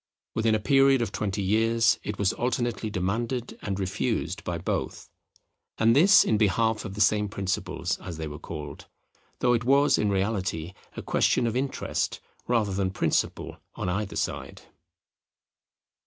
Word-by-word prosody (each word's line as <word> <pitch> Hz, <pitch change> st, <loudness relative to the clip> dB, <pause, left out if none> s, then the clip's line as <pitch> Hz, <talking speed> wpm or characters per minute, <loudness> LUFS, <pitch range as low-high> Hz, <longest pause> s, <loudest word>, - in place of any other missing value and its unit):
Within 110 Hz, -1 st, +2 dB
a -, -, 0 dB
period 135 Hz, +2 st, +4 dB
of 105 Hz, -, -4 dB
twenty 100 Hz, -1 st, -2 dB
years, 115 Hz, +3 st, +3 dB
it 105 Hz, -1 st, -5 dB
was 100 Hz, -2 st, +1 dB
alternately 120 Hz, -2 st, -1 dB
demanded 115 Hz, +6 st, -2 dB
and 100 Hz, -1 st, -3 dB
refused 95 Hz, -, -2 dB
by 85 Hz, -, -3 dB
both; 85 Hz, -, -3 dB, 0.7 s
and 115 Hz, +1 st, +4 dB
this 190 Hz, +7 st, +7 dB
in 110 Hz, -, +1 dB
behalf 110 Hz, +2 st, +1 dB
of 100 Hz, -2 st, -6 dB
the 105 Hz, -, -2 dB
same 105 Hz, -1 st, +3 dB
principles, 100 Hz, -3 st, -2 dB
as 85 Hz, -, -7 dB
they 80 Hz, -1 st, -4 dB
were 75 Hz, 0 st, -8 dB
called, 75 Hz, -3 st, -8 dB, 0.5 s
though 125 Hz, -1 st, +4 dB
it 115 Hz, -1 st, +1 dB
was 140 Hz, +3 st, +4 dB
in 105 Hz, -, +1 dB
reality 95 Hz, -4 st, -1 dB, 0.2 s
a -, -, -5 dB
question -, -, +2 dB
of 115 Hz, 0 st, -1 dB
interest 135 Hz, +1 st, -2 dB, 0.3 s
rather 110 Hz, -5 st, +1 dB
than 95 Hz, 0 st, 0 dB
principle 95 Hz, -, -1 dB, 0.2 s
on 90 Hz, -, -3 dB
either 100 Hz, +3 st, -2 dB
side. -, -, -4 dB
105 Hz, 155 wpm, -26 LUFS, 95-115 Hz, 0.7 s, this